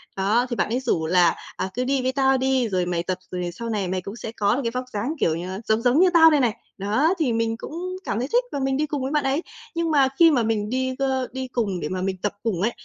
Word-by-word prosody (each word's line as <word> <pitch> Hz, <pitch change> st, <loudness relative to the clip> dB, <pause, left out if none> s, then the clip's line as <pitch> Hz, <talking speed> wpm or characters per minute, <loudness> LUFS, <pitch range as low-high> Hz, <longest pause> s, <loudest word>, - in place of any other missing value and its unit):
Đó, 210 Hz, +6 st, +2 dB
thì 240 Hz, -, -2 dB
bạn -, -, 0 dB
ấy 240 Hz, +3 st, 0 dB
rủ 230 Hz, -11 st, 0 dB
là 175 Hz, 0 st, +4 dB, 0.2 s
"À, 190 Hz, -, -3 dB
cứ 250 Hz, -, -1 dB
đi 270 Hz, +1 st, +1 dB
với 255 Hz, +1 st, 0 dB
tao 265 Hz, 0 st, +3 dB
đi, 260 Hz, -2 st, +1 dB
rồi 185 Hz, -2 st, 0 dB
mày 175 Hz, -1 st, -1 dB
tập, 185 Hz, +1 st, -2 dB
rồi 180 Hz, -1 st, -3 dB
sau 230 Hz, +6 st, -6 dB
này 205 Hz, -4 st, -1 dB
mày 185 Hz, +1 st, -2 dB
cũng 200 Hz, +4 st, -7 dB
sẽ 225 Hz, -, -6 dB
có 210 Hz, -1 st, +1 dB
được 275 Hz, -, -1 dB
cái 230 Hz, -, -1 dB
vóc 255 Hz, +1 st, -3 dB
dáng, 220 Hz, +9 st, -2 dB
kiểu 160 Hz, -, +2 dB
như, 185 Hz, +3 st, -5 dB
giống 220 Hz, +1 st, +2 dB
giống 250 Hz, +4 st, +3 dB
như 370 Hz, +1 st, +6 dB
tao 325 Hz, -1 st, +8 dB
đây 300 Hz, -, +4 dB
này." 240 Hz, -5 st, +1 dB, 0.2 s
Đó, 220 Hz, -, +2 dB
thì 270 Hz, -7 st, +1 dB
mình 225 Hz, 0 st, 0 dB
cũng -, -, -8 dB, 0.3 s
cảm 220 Hz, -, -2 dB
thấy 250 Hz, -, -2 dB
thích -, -, +4 dB
và 285 Hz, -, -3 dB
mình 270 Hz, 0 st, 0 dB
đi 305 Hz, -, +1 dB
cùng 290 Hz, -2 st, -3 dB
với 265 Hz, +1 st, -2 dB
bạn 300 Hz, -1 st, +1 dB
ấy. 270 Hz, +4 st, +1 dB, 0.3 s
Nhưng 335 Hz, -1 st, 0 dB
mà 280 Hz, -3 st, +5 dB
khi 335 Hz, -1 st, +8 dB
mà 250 Hz, -6 st, +2 dB
mình 215 Hz, -2 st, -1 dB
đi, 260 Hz, +1 st, -1 dB
ơ, 265 Hz, -2 st, 0 dB
đi 260 Hz, +1 st, -4 dB
cùng 220 Hz, -7 st, -2 dB
để 150 Hz, -, -4 dB
mà 185 Hz, 0 st, -3 dB
mình 190 Hz, 0 st, -2 dB
tập 205 Hz, -, -1 dB
cùng 210 Hz, -7 st, -1 dB
ấy, 225 Hz, +4 st, +2 dB
235 Hz, 295 wpm, -23 LUFS, 200-265 Hz, 0.3 s, tao